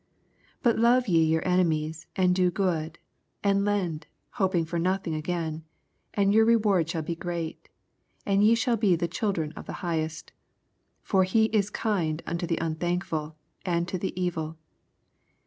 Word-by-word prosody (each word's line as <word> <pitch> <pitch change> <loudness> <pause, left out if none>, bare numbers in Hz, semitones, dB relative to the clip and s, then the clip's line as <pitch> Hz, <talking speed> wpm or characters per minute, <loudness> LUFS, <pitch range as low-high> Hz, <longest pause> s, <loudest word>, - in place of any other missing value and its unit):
85 - - -38
But 235 -3 +3
love 240 +2 +4
ye 165 -4 +3
vour 160 0 +1
enemies, 160 -3 0
and 180 -1 +3
do 180 -1 +3
^ood, 170 -4 -1 0.5
and 200 -1 +3
lend, 185 -6 -1 0.3
Lopini^ 185 -5 +1
for 170 +1 -2
nothing 185 -1 0
agam; 160 0 -3 0.5
and 200 -1 +3
your 220 +1 +6
reward 210 -7 +3
snail 165 -2 -2
be 170 - -3
great, 170 -1 -5 0.6
and 200 0 +3
ye 220 +2 +6
shall 230 0 +1
be 200 -5 +3
the 170 +1 -1
children 175 -4 -2
of - - -10
the - - -5
Highest: 160 -1 -3 0.7
for 190 -1 +3
he 220 +4 +3
is 205 -2 +2
kind 175 -8 -1
unto 170 +1 -3
the 165 - -1
un 160 -1 -2
thankfhl 165 -3 -2 0.3
and 170 -1 0
to 185 - -3
the 185 0 -4
evil. 165 -3 -2
175 Hz, 165 wpm, -27 LUFS, 160-200 Hz, 0.7 s, your